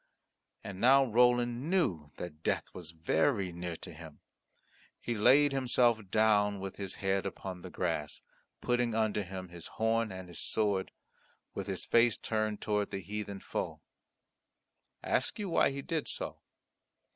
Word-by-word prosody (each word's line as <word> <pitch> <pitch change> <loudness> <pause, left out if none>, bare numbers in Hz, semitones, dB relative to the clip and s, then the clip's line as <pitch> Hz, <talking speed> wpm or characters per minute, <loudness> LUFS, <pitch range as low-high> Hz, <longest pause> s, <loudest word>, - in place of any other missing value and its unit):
And 100 -1 -7
now 135 +3 +6
Roland 120 +3 +2
knew 90 - +1
that 80 -3 -7
death - - 0
was 85 -4 -7
very 90 - +1
near 85 0 -5
to - - -9
him. 80 -1 -12 0.8
He 120 - -3
laid 135 +7 +5
himself 125 -3 +3
down 105 -1 +3
with 95 0 -6
his 100 -2 -4
head 95 0 0
upon 95 -1 -6
the 90 - -8
grass 80 -5 -3 0.4
putting 120 -2 +1
under 110 -2 +1
him 95 -1 -7
his 85 -1 -9
horn 115 -1 +1
and 95 -1 -7
his 85 - -7
sword, 100 -3 +1 0.6
with - - -5
his - - -3
face 120 0 +4
turned 110 -1 -2
towards 105 -1 0
the 95 - -4
heathen 100 +1 -5
foe. - - -4 1.2
Ask - - 0
you 205 -3 -3
why - - +4
he 140 0 -5
did 160 -1 -2
so? - - -5
105 Hz, 150 wpm, -32 LUFS, 90-120 Hz, 1.2 s, now